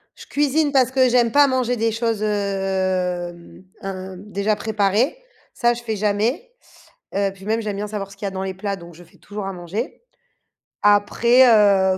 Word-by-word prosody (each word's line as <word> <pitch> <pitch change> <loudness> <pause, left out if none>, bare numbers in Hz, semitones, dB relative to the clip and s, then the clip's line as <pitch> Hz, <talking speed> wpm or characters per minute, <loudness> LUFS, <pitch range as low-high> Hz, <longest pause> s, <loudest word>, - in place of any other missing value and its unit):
Je - - -12
cuisine 290 +1 +1
parce 260 -2 +3
que 260 -1 +4
j'aime 240 -1 +3
pas 285 +2 +6
manger 250 -2 0
des 225 0 +1
choses, 225 -2 -1
hem, 190 -4 -2 0.2
heu, 190 -1 -6
déjà 205 +2 -1
préparées, 215 - +1 0.4
ça 240 -1 +2
je 240 - -7
fais 225 -2 -3
jamais. 220 - -1 0.6
Heu, 200 0 +1
puis 195 0 -14
même 225 +1 0
j'aime 205 -2 -4
bien 210 +1 -3
savoir 200 -2 -5
ce 195 - -14
qu'il 200 - -6
y - - 0
a - - -4
dans 190 0 -4
les 190 -1 -3
plats 200 +1 -3
donc 170 -2 -13
je 175 - -14
fais - - -23
toujours 205 -1 -7
à 195 - -4
manger. 180 - -5 0.8
Après, 235 +5 +5
heu, 200 -4 +5
205 Hz, 190 wpm, -21 LUFS, 195-235 Hz, 0.8 s, pas